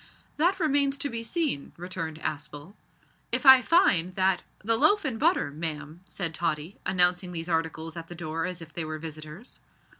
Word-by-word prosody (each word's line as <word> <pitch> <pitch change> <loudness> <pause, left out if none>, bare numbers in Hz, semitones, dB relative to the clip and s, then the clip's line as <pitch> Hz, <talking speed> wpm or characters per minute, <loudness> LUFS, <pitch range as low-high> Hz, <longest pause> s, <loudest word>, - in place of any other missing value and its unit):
"That 355 +5 +2
remains 280 -4 +2
to 285 - -1
be 230 0 -4
seen," 290 - -2
returned 165 -3 -5
Aspel. 150 +2 -6 0.6
"If - - 0
I 265 -1 +10
find 185 - +3
that 190 -1 +2
" - - -39
"The 225 +1 +3
loaf 310 - +3
and 240 -6 -2
butter, 330 - +2
ma'am," 155 +1 -6
said 175 -4 -3
Tottie, 160 +2 -3
announcing 180 0 +3
these 165 0 -4
articles 160 -1 -2
at 165 -1 -7
the 175 - -9
door 165 0 -3
as 180 -2 -6
if 160 -1 -15
they 170 - -3
were 155 0 -4
visitors. 155 - -9
175 Hz, 180 wpm, -27 LUFS, 160-240 Hz, 0.6 s, I